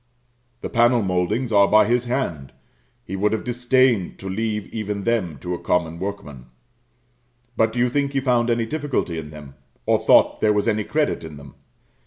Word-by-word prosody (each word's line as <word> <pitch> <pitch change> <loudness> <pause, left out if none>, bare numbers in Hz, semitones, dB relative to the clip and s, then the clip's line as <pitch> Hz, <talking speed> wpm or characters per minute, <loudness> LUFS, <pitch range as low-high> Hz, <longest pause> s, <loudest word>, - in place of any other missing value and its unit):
The - - -5
panel 120 -1 +3
mouldings 100 +7 -1
are 100 -2 +5
by 105 +1 +5
his 120 +2 +1
hand; 105 - -3 0.5
he 95 - -6
would 105 +2 +1
have 110 - -2
disdained 125 -4 +1
to 95 - -9
leave 105 +1 -2
even 105 -2 -4
them 100 -10 -1
to 90 - -4
a 90 - -4
common 85 -2 -1
workman; 75 -10 -7 1.1
but 110 0 +2
do 120 - -8
you 120 +1 +3
think 140 +2 -1
he 135 - +1
found 125 -3 +1
any 115 -1 +1
difficulty 140 - -2
in 75 -2 -8
them, 75 -3 -11 0.3
or - - +2
thought - - +4
there 105 -1 +3
was 105 +2 0
any 110 -2 0
credit 150 - -1
in 80 -2 -9
them? 70 -1 -13
105 Hz, 185 wpm, -22 LUFS, 90-120 Hz, 1.1 s, are